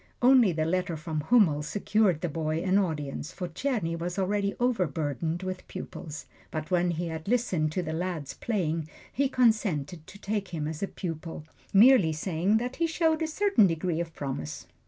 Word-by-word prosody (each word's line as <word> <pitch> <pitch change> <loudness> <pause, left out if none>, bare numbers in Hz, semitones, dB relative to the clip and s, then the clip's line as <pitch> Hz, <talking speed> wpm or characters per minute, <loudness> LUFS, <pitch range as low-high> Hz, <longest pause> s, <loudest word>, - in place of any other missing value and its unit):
Only 250 -5 +6
the 155 -1 -1
letter 175 -1 -1
from 155 0 -3
Hummel 165 -5 +4
secured 195 +1 +1
the - - 0
boy 155 +1 -2
an 190 +1 +3
audience, 155 -4 -3
for 180 -1 -5
Czerny 195 - -1
was 175 +2 -4
already 200 +1 0
overburdened 165 - -1
with 185 0 -5
pupils. 160 -1 -7 0.2
But 155 +2 -5
when 180 0 +3
he 170 0 -2
had 160 +1 -6
listened 195 -10 +1
to 185 - -1
the 160 -1 -4
lad's 170 -4 -3
playing, 165 -8 -2 0.2
he 275 +1 +1
consented 195 - +1
to 200 - -11
take 200 0 -2
him 155 -4 -3
as 155 -1 -5
a 200 - 0
pupil, 165 -4 -6 0.3
merely 205 -6 +6
saying 175 +5 +1
that 245 +3 -3
he 335 - +2
showed 320 -1 +1
a 320 - +1
certain 355 - +4
degree 165 0 -1
of 165 -1 -4
promise. 130 - -5
175 Hz, 180 wpm, -28 LUFS, 160-210 Hz, 0.3 s, Only